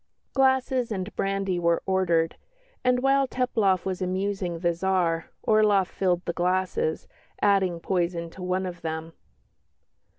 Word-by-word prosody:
Glasses 260 -2 +2
and 190 0 -4
brandy 195 -2 -1
were 170 -1 +1
ordered, 175 -4 +1 0.5
and 250 0 +2
while 270 0 +3
Teplof 220 -8 +1
was 190 -1 -3
amusing 185 -1 -2
the 170 0 +1
Tsar, 170 -2 0
Orloff 210 -3 +4
filled 180 -1 -1
the 170 - -2
glasses, 185 - 0 0.3
adding 190 -4 +2
poison 170 -1 -1
to 185 - -11
one 185 +1 -1
of 175 -2 -6
them. 160 0 -4
185 Hz, 130 wpm, -26 LUFS, 175-205 Hz, 0.5 s, Orloff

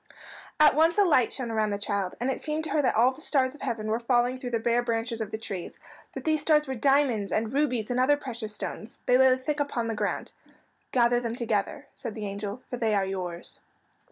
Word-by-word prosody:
At 305 -1 +7
once 325 +4 +4
a 410 - +6
light 260 -9 +3
shone 245 -4 -4
around 215 -1 +1
the 200 - -1
child, 200 -2 -2
and 250 +3 0
it - - -5
seemed 310 +1 -2
to 310 - -3
her 300 - +2
that 260 - +1
all 240 +4 +5
the 265 +4 -13
stars 265 -4 +1
of 295 - -15
heaven 225 -2 -3
were 220 +2 0
falling 245 +1 +1
through 250 - -5
the 230 -2 0
bare 235 +1 +2
branches 230 -1 -2
of 215 - -3
the 220 - -4
trees, 195 -5 -6 0.3
but - - -7
these 310 -1 +1
stars 300 0 +3
were 265 - -3
diamonds 260 -5 +2
and 220 +2 -1
rubies 250 -6 0
and 245 - 0
other 285 +3 +4
precious 230 -6 -6
stones. 215 +2 -6
They 250 +1 +4
lay 260 -1 +6
thick 290 +3 -3
upon 280 -5 -1
the - - -1
ground. 215 - -3 0.6
"Gather 240 -1 +3
them 235 -1 -3
together," 225 -4 -2
said 220 - -7
the 215 - -5
angel, 200 +4 -5
"for 245 - -5
they 225 -3 +1
are 195 -1 +2
yours." 180 -3 -5
240 Hz, 235 wpm, -27 LUFS, 220-270 Hz, 0.6 s, At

